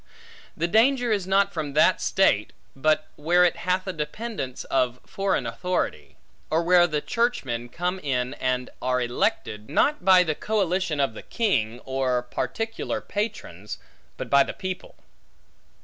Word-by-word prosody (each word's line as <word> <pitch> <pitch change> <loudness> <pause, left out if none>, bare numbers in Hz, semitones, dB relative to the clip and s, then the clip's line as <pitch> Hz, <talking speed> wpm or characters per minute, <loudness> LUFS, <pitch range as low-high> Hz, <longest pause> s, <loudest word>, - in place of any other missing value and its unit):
The 170 - 0
danger 245 +5 +3
is 200 -4 0
not 195 +1 +3
from 150 -4 -3
that 155 +5 +4
state, 150 - +2 0.2
but 155 +3 +1
where 175 +4 +4
it 175 - +2
hath 185 +1 -1
a 190 - -3
dependence 150 - -5
of 125 -2 0
foreign 195 -9 -1
authority; 115 - -3 0.3
or 160 +2 +1
where 175 0 +5
the 150 -3 -1
churchmen 130 - -1
come 180 +6 -2
in 125 -5 -1
and 125 0 -1
are 125 0 +1
elected, 110 -3 -1
not 295 -10 +2
by 185 -1 +7
the 160 -3 -1
collation 185 -4 -1
of 135 -5 +1
the - - -9
king, 125 - -1
or 130 -2 0
particular 225 - -3
patrons, 200 - -5 0.4
but - - -5
by 140 0 +5
the - - 0
people. 185 -1 -6
160 Hz, 150 wpm, -25 LUFS, 125-190 Hz, 0.4 s, by